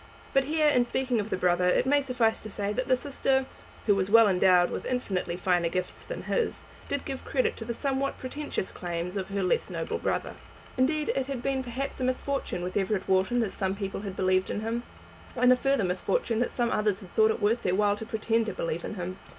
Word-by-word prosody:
But 270 Hz, 0 st, +3 dB
here, 305 Hz, +1 st, +2 dB
in 250 Hz, -4 st, +4 dB
speaking 250 Hz, 0 st, 0 dB
of 210 Hz, +1 st, -3 dB
the -, -, -1 dB
brother, 180 Hz, 0 st, +2 dB
it 180 Hz, -, +3 dB
may 285 Hz, +2 st, +4 dB
suffice 245 Hz, -4 st, +1 dB
to 215 Hz, -, -8 dB
say, 205 Hz, 0 st, -2 dB
that 255 Hz, +3 st, -2 dB
the 255 Hz, -, +4 dB
sister, 265 Hz, -1 st, 0 dB, 0.4 s
who 205 Hz, -, +5 dB
was 195 Hz, -1 st, 0 dB
endowed 190 Hz, -5 st, +5 dB
with -, -, -4 dB
infinitely 190 Hz, -8 st, -2 dB
finer 175 Hz, -2 st, +1 dB
gifts 185 Hz, +2 st, -3 dB
than -, -, -6 dB
his, 470 Hz, -3 st, -1 dB, 0.2 s
did 285 Hz, -1 st, -3 dB
give 270 Hz, -2 st, -5 dB
credit 475 Hz, -2 st, 0 dB
to 225 Hz, -, -6 dB
the 235 Hz, -, -2 dB
somewhat 275 Hz, 0 st, -1 dB
pretentious 260 Hz, -6 st, -4 dB
claims 175 Hz, +1 st, -4 dB
of 190 Hz, -2 st, -2 dB
her 195 Hz, 0 st, -1 dB
less 180 Hz, -, +1 dB
noble 165 Hz, -3 st, -3 dB
brother. -, -, -2 dB, 0.4 s
Indeed 300 Hz, +4 st, +1 dB
it 265 Hz, -1 st, -1 dB
had 265 Hz, -3 st, -4 dB
been 270 Hz, -1 st, 0 dB
perhaps 260 Hz, +3 st, -4 dB
a -, -, -2 dB
misfortune 255 Hz, -6 st, -1 dB
with 180 Hz, +1 st, -4 dB
Everett 195 Hz, -1 st, 0 dB
Wharton 190 Hz, +6 st, +2 dB
that 215 Hz, -4 st, -1 dB
some 190 Hz, 0 st, -1 dB
people 195 Hz, -1 st, -4 dB
had 195 Hz, -2 st, -6 dB
believed 185 Hz, 0 st, +2 dB
in 210 Hz, -, -2 dB
him, 225 Hz, +2 st, -2 dB, 0.5 s
and 250 Hz, 0 st, +6 dB
a -, -, +4 dB
further 270 Hz, -2 st, +1 dB
misfortune 220 Hz, -, 0 dB
that 245 Hz, -, +1 dB
some 240 Hz, -1 st, 0 dB
others 210 Hz, -2 st, +1 dB
had 185 Hz, -3 st, -13 dB
thought 220 Hz, 0 st, +5 dB
it 220 Hz, -, 0 dB
worth 225 Hz, +3 st, +2 dB
their 180 Hz, -, +1 dB
while 205 Hz, 0 st, +3 dB
to 220 Hz, -, -6 dB
pretend 225 Hz, 0 st, 0 dB
to -, -, -2 dB
believe 165 Hz, 0 st, -3 dB
in -, -, -5 dB
him. 185 Hz, 0 st, -5 dB
220 Hz, 225 wpm, -28 LUFS, 190-260 Hz, 0.5 s, and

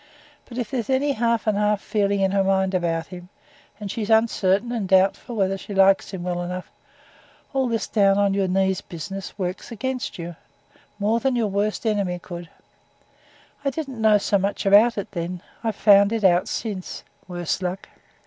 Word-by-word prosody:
But 240 Hz, -, -10 dB
if 245 Hz, -2 st, -3 dB
there's 245 Hz, -4 st, -2 dB
any 270 Hz, +2 st, +2 dB
half 235 Hz, -2 st, 0 dB
and 215 Hz, -2 st, +2 dB
half 210 Hz, -1 st, +2 dB
feeling 200 Hz, -1 st, 0 dB
in 190 Hz, -1 st, +2 dB
her 195 Hz, 0 st, +2 dB
mind 190 Hz, 0 st, +1 dB
about 165 Hz, -2 st, 0 dB
him, 180 Hz, 0 st, -11 dB, 0.5 s
and 205 Hz, -2 st, -5 dB
she's 215 Hz, -1 st, -4 dB
uncertain 220 Hz, -1 st, +2 dB
and 225 Hz, -5 st, -2 dB
doubtful 190 Hz, +5 st, +2 dB
whether 195 Hz, -2 st, 0 dB
she 200 Hz, -, -7 dB
likes 195 Hz, 0 st, +4 dB
him 190 Hz, -3 st, -6 dB
well 175 Hz, -1 st, -2 dB
enough, 180 Hz, +1 st, -5 dB, 0.8 s
all 265 Hz, -1 st, +1 dB
this 230 Hz, -2 st, -1 dB
down 195 Hz, -2 st, +3 dB
on 200 Hz, -1 st, +2 dB
your 195 Hz, -1 st, +1 dB
knees 190 Hz, 0 st, +1 dB
business 195 Hz, +4 st, -7 dB
works 185 Hz, +3 st, -4 dB
against 255 Hz, +3 st, -4 dB
you, 170 Hz, 0 st, -6 dB, 0.6 s
more 215 Hz, +3 st, +1 dB
than 265 Hz, 0 st, 0 dB
your 225 Hz, -3 st, +1 dB
worst 205 Hz, +3 st, -1 dB
enemy 200 Hz, -5 st, 0 dB
could 175 Hz, 0 st, -8 dB
do. -, -, -22 dB, 1.1 s
I 280 Hz, -, +1 dB
didn't 270 Hz, -5 st, -5 dB
know 215 Hz, -1 st, +5 dB
so 200 Hz, 0 st, +1 dB
much 200 Hz, +2 st, -2 dB
about 210 Hz, +4 st, +5 dB
it 200 Hz, -, -4 dB
then. 175 Hz, -1 st, -5 dB, 0.2 s
I've 225 Hz, -3 st, -1 dB
found 200 Hz, 0 st, +5 dB
it 225 Hz, -2 st, -1 dB
out 180 Hz, -1 st, +4 dB
since, 200 Hz, -5 st, -5 dB, 0.2 s
worse 175 Hz, 0 st, -3 dB
luck. 185 Hz, +1 st, -4 dB
200 Hz, 185 wpm, -23 LUFS, 185-225 Hz, 1.1 s, know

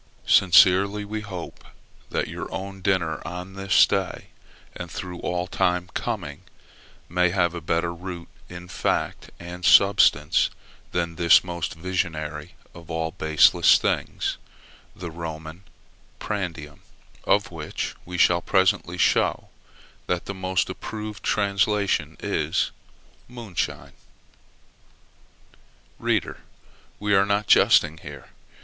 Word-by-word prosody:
Sincerely 100 Hz, +3 st, +5 dB
we 105 Hz, +1 st, -4 dB
hope 95 Hz, -5 st, -8 dB, 0.5 s
that -, -, -1 dB
your -, -, -7 dB
own 95 Hz, 0 st, -6 dB
dinner 90 Hz, -4 st, 0 dB
on 90 Hz, +2 st, -7 dB
this 95 Hz, -2 st, +4 dB
day, -, -, -3 dB, 0.5 s
and -, -, -7 dB
through 90 Hz, -2 st, -7 dB
all 90 Hz, 0 st, -2 dB
time 90 Hz, -1 st, -1 dB
coming, -, -, -4 dB, 0.7 s
may 90 Hz, +1 st, +2 dB
have 85 Hz, -2 st, +1 dB
a 85 Hz, -, -6 dB
better 85 Hz, +2 st, -1 dB
root 90 Hz, -1 st, -8 dB, 0.2 s
in 90 Hz, 0 st, -9 dB
fact -, -, -2 dB
and 90 Hz, +1 st, -9 dB
substance 100 Hz, +3 st, +5 dB, 0.4 s
than 85 Hz, -2 st, -2 dB
this 85 Hz, -2 st, +6 dB
most 85 Hz, -3 st, -4 dB
visionary 80 Hz, -3 st, -4 dB, 0.2 s
of 85 Hz, -1 st, -14 dB
all 80 Hz, -1 st, -2 dB
baseless 80 Hz, -3 st, +5 dB
things -, -, -2 dB, 0.6 s
the 85 Hz, -2 st, -7 dB
Roman 80 Hz, +2 st, -8 dB, 0.5 s
prandium, 85 Hz, -8 st, -5 dB, 0.5 s
of -, -, +2 dB
which -, -, -5 dB
we 90 Hz, 0 st, -6 dB
shall 85 Hz, 0 st, +4 dB
presently 95 Hz, -2 st, +1 dB
show -, -, +1 dB
you -, -, -28 dB
that 90 Hz, -1 st, -1 dB
the 100 Hz, -, -5 dB
most 95 Hz, -1 st, -1 dB
approved 105 Hz, -1 st, -7 dB
translation 100 Hz, -6 st, 0 dB
is -, -, -1 dB, 0.6 s
moonshine. 115 Hz, -8 st, -5 dB, 2.1 s
Reader, -, -, -1 dB, 0.6 s
we 105 Hz, 0 st, 0 dB
are 95 Hz, 0 st, +5 dB
not 100 Hz, +1 st, +1 dB
jesting 80 Hz, -5 st, +4 dB
here. 70 Hz, -3 st, -11 dB
90 Hz, 115 wpm, -24 LUFS, 85-95 Hz, 2.1 s, this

